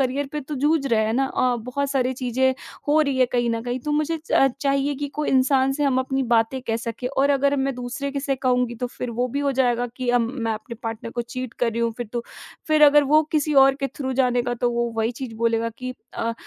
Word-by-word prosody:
Career 270 +2 0
पे 300 - -2
तो 295 +2 -6
जूझ 295 +1 +1
रहे 225 -4 +2
हैं 220 - 0
ना 270 +2 +2
अ, 250 -2 +1
बहुत 255 +4 -3
सारी 260 -2 +1
चीज़ें 260 +1 0 0.3
हो 305 +2 +5
रही 280 -3 +1
हैं 255 - +5
कहीं 240 -1 +1
न 230 0 -1
कहीं। 245 +1 -3
तो 295 +4 -3
मुझे 305 +2 0
च 270 - +5
चाहिए 275 0 +1
कि 285 +1 -4
कोई 300 - 0
इंसान 265 0 +3
से 295 +2 -2
हम 265 -2 +2
अपनी 265 +1 0
बातें 230 +3 +2
कह 225 - 0
सकें 230 +2 -5
और 275 +1 +1
अगर 280 0 +2
मैं 270 -1 0
दूसरे 250 +3 -4
के 280 - -2
से 275 -1 -1
कहूँगी 250 -2 +1
तो 250 +2 -3
फिर 245 0 -6
वो 245 +2 -1
भी 280 +4 -2
हो 280 -1 +1
जाएगा 245 -2 +1
कि 255 -2 -4
अम, 240 -1 +2
मैं 230 -4 -2
अपने 220 +2 -7
पार्टनर 225 0 -5
को 240 +1 -3
चीट 245 0 -6
कर 235 - +3
रही 230 - -2
हूँ, 230 0 +1
फिर 240 -2 -4
तो। 240 - -2 0.5
फिर 310 -1 +4
अगर 295 0 +7
वो 310 - +7
किसी 305 -1 +1
और 270 0 +4
के - - +2
थ्रू 265 -2 -3
जानेगा 245 -2 +1
तो 245 - +2
वो 235 0 0
वही 225 +1 +1
चीज़ 250 -4 -5
बोलेगा 230 0 0
कि 255 0 -5 0.2
अ 230 0 -1
255 Hz, 255 wpm, -23 LUFS, 240-275 Hz, 0.5 s, अगर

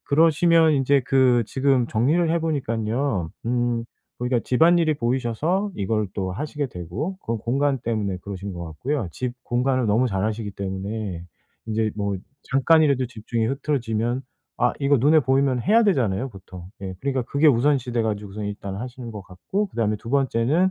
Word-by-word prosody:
그러시면 160 +1 +4
인제 140 0 +3
그 130 -3 +4
지금 130 -1 +2
정리를 155 +9 +2
해 170 - +2
보니깐요. 115 - -1 0.2
음 120 -1 0 0.3
보니까 125 0 +1
집안일이 165 +4 +4
보이셔서 135 - 0
이걸 105 +1 -1
또 95 -2 -2
하시게 145 +5 -3
되고 115 - -5
그건 115 0 -2
공간 135 +4 0
때문에 105 -5 -2
그러신 100 -1 -6
것 85 - -6
같고요. 115 - -3
집 125 -1 -4
공간을 130 +1 +1
너무 115 +5 +3
잘 95 -2 -1
아시기 110 -1 -3
때문에 95 -1 -4 0.4
인제 110 0 0
뭐 100 -1 -1 0.3
잠깐이라도 140 -1 +4
집중이 115 0 -3
흐트러지면 120 -3 -1 0.4
아 125 - +3
이거 140 +1 +4
눈에 150 +5 +5
보이면 130 -1 +2
해야 225 +3 +4
되잖아요 130 - +1
보통. 95 -3 -11 0.2
예. 95 -1 -5
그러니까 135 -2 -1
그게 140 +6 +1
우선시 130 -1 +2
돼 120 - +1
가지고선 105 -1 -3
일단 100 -1 -5
하시는 125 +1 -7
것 105 - -7
같고 105 - -3
그다음에 110 - -1
2 115 - -11
번째는 135 +6 +2
120 Hz, 365 characters per minute, -23 LUFS, 105-140 Hz, 0.4 s, 눈에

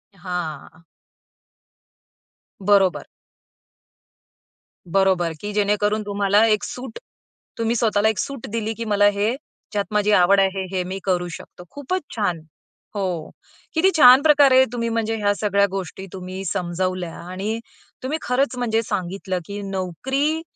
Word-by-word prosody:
हां. 175 -3 -6 1.8
बरोबर. 195 -2 +3 1.8
बरोबर 185 -1 +2
की 205 - -4
जेणेकरून 210 +1 +1
तुम्हाला 205 +1 +3
एक 215 -1 +2
सूट, 260 - -7 0.6
तुम्ही 230 +1 0
स्वतःला 220 -2 +2
एक 220 - -2
सूट 275 -4 -4
दिली 225 0 -2
की 230 - -4
मला 205 -1 +4
हे 215 +5 +1 0.4
ज्यात 205 -1 -1
माझी 210 0 +2
आवड 195 0 +5
आहे 195 0 +1
हे, - - -4
हे 180 - 0
मी 185 +2 -5
करू 180 -2 0
शकतो. 180 - -13
खूपच 285 - -3
छान. 200 -7 -1 0.6
हो. 180 -6 -2 0.4
किती 335 +4 +4
छान 255 -2 +9
प्रकारे 280 -4 +6
तुम्ही 230 -1 -1
म्हणजे 225 -1 -1
ह्या 205 -1 +1
सगळ्या 200 -1 +2
गोष्टी 190 0 -5
तुम्ही 185 0 -6
समजावल्या 180 -1 -2 0.2
आणि 205 +5 -3 0.4
तुम्ही 280 +5 -1
खरंच 255 +1 0
म्हणजे 225 -2 +1
सांगितलं 190 -2 -3
की 205 +3 -6
नोकरी 265 - -1
205 Hz, 130 wpm, -22 LUFS, 185-230 Hz, 1.8 s, छान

